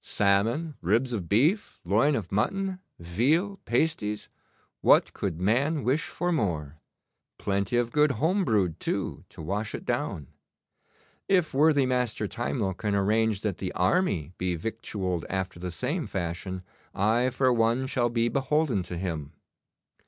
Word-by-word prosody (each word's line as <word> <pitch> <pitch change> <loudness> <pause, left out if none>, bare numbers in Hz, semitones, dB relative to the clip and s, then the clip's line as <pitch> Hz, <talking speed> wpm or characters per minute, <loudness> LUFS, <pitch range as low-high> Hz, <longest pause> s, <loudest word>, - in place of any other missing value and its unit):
'Salmon, 110 +11 +1
ribs 115 +8 +1
of 95 -7 -3
beef, 155 - +2
loin 115 - +3
of 100 -8 -4
mutton, 190 - 0 0.2
veal, 140 - +1
pasties 120 -6 0 0.5
what - - +4
could 85 -5 -3
man 130 - +1
wish 135 +6 +1
for 175 +2 -2
more? 80 - -1 0.6
Plenty 100 +3 0
of 120 -1 +1
good 150 +1 +3
home 185 +8 +1
brewed, 100 - +1
too, - - -2
to - - -10
wash 100 +6 -2
it - - -8
down. 75 - -2 1.0
If 180 -5 +3
worthy 145 0 +4
Master 125 -4 0
Timewell 110 -3 -2
can 105 +2 -2
arrange 105 +1 +2
that 105 -4 -2
the 95 - -3
army 90 - +1
be 90 -1 0
victualled 95 -2 -3
after 95 -2 -3
the 90 +1 -4
same 135 - -2
fashion, 90 +1 -4 0.3
I 115 +6 +2
for 130 0 +2
one 115 +3 +2
shell 125 -2 +1
be 115 0 +1
beholden 135 -3 +1
to 90 0 -6
him. 80 -4 -4
110 Hz, 145 wpm, -27 LUFS, 95-135 Hz, 1.0 s, what